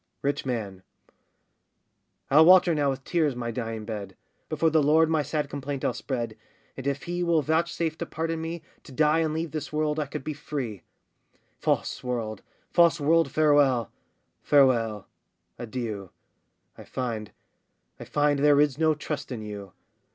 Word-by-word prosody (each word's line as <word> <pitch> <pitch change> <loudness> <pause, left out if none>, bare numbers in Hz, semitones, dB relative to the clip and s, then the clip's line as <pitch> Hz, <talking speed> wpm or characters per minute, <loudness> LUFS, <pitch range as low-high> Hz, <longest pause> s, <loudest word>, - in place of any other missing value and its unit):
RICH 140 -1 -1
MAN. 105 -7 -3 1.5
I'll 150 +3 +8
water 180 0 +7
now 145 -2 +1
with 135 0 -3
tears 155 -6 +1
my 120 -1 -3
dying 115 -2 -4
bed, 100 -4 -6 0.3
Before 160 +1 +1
the 160 0 +4
Lord 160 +2 +4
my 160 -2 +2
sad 150 +1 -2
complaint 140 -1 -4
I'll - - +1
spread, 120 -4 -4 0.4
And 135 - -6
if 140 0 -1
He 175 0 -3
will 170 -3 +2
vouchsafe 160 +1 0
to - - -3
pardon 165 0 -3
me, 165 0 -5 0.2
To - - -14
die 150 +4 +3
and 160 -1 +1
leave 160 0 -3
this 155 0 -5
world 150 0 0
I 150 - -1
could 135 - -6
be 155 - -3
free. 135 - -5 0.8
False - - -1
world! 115 -4 -3 0.3
false 170 -1 +5
world, 160 0 +3
farewell! 145 -7 +3 0.5
farewell! 115 -7 +3 0.5
adieu! 110 -5 -5 0.7
I - - -9
find, 115 -5 -4 0.7
I - - -7
find, 145 -1 +1
there 145 0 +5
is 145 -1 +2
no 160 -1 +3
trust 150 -2 -5
in 115 -4 -5
you! 100 -3 -7
145 Hz, 160 wpm, -26 LUFS, 120-155 Hz, 1.5 s, I'll